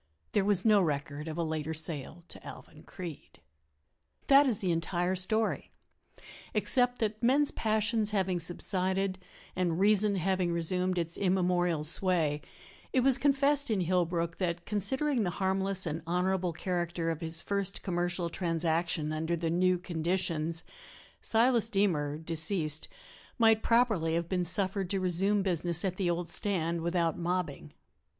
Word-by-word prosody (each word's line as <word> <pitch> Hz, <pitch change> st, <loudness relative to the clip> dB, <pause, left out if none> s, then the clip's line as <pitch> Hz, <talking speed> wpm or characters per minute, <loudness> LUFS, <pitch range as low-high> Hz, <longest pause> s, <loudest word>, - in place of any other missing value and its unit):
There 205 Hz, -, +2 dB
was 200 Hz, -1 st, +1 dB
no 210 Hz, -2 st, +5 dB
record 145 Hz, -1 st, -3 dB
of 160 Hz, 0 st, -5 dB
a 170 Hz, -, 0 dB
later 160 Hz, 0 st, -3 dB
sale 160 Hz, +1 st, -3 dB
to -, -, -13 dB
Alvan -, -, -11 dB
Creede. 175 Hz, -6 st, -10 dB, 0.9 s
That 280 Hz, +1 st, +6 dB
is 230 Hz, -6 st, +2 dB
the 185 Hz, -3 st, 0 dB
entire 175 Hz, +2 st, -1 dB
story 215 Hz, +4 st, 0 dB, 0.9 s
except 245 Hz, +4 st, +3 dB
that 215 Hz, -1 st, -2 dB
men's 275 Hz, +4 st, +3 dB
passions 215 Hz, 0 st, 0 dB
having 190 Hz, -4 st, 0 dB
subsided 185 Hz, +2 st, -1 dB, 0.4 s
and 175 Hz, -2 st, 0 dB
reason 205 Hz, 0 st, +3 dB
having 185 Hz, -1 st, 0 dB
resumed 180 Hz, +2 st, 0 dB
its 170 Hz, -1 st, -3 dB
immemorial 180 Hz, -4 st, +1 dB
sway, 160 Hz, -3 st, +1 dB, 0.5 s
it 260 Hz, -, +2 dB
was 270 Hz, 0 st, +3 dB
confessed 285 Hz, 0 st, +3 dB
in 210 Hz, -4 st, +1 dB
Hillbrook 170 Hz, -1 st, -1 dB
that, 175 Hz, -2 st, -2 dB
considering 250 Hz, +7 st, 0 dB
the 180 Hz, -, 0 dB
harmless 190 Hz, 0 st, +1 dB
and 160 Hz, 0 st, -3 dB
honorable 180 Hz, +1 st, 0 dB
character 170 Hz, -1 st, -2 dB
of 165 Hz, 0 st, -5 dB
his 165 Hz, 0 st, -2 dB
first 200 Hz, -1 st, -1 dB
commercial 175 Hz, -1 st, -1 dB
transaction 165 Hz, -2 st, -1 dB
under 160 Hz, +2 st, -1 dB
the 165 Hz, -1 st, -2 dB
new 180 Hz, +1 st, +2 dB
conditions, 170 Hz, -1 st, -2 dB, 0.6 s
Silas 230 Hz, 0 st, +3 dB
Deemer, 165 Hz, -9 st, 0 dB
deceased, 160 Hz, -1 st, -1 dB, 0.5 s
might 225 Hz, -2 st, +4 dB
properly 220 Hz, -10 st, +2 dB
have 170 Hz, 0 st, -1 dB
been 180 Hz, 0 st, -1 dB
suffered 190 Hz, +1 st, 0 dB
to 195 Hz, -, -1 dB
resume 190 Hz, +3 st, +2 dB
business 175 Hz, -1 st, -1 dB
at 185 Hz, -1 st, -2 dB
the 185 Hz, -3 st, 0 dB
old 170 Hz, 0 st, -2 dB
stand 170 Hz, -4 st, -1 dB
without 170 Hz, -1 st, 0 dB
mobbing. 170 Hz, -, -3 dB
180 Hz, 145 wpm, -30 LUFS, 165-200 Hz, 0.9 s, That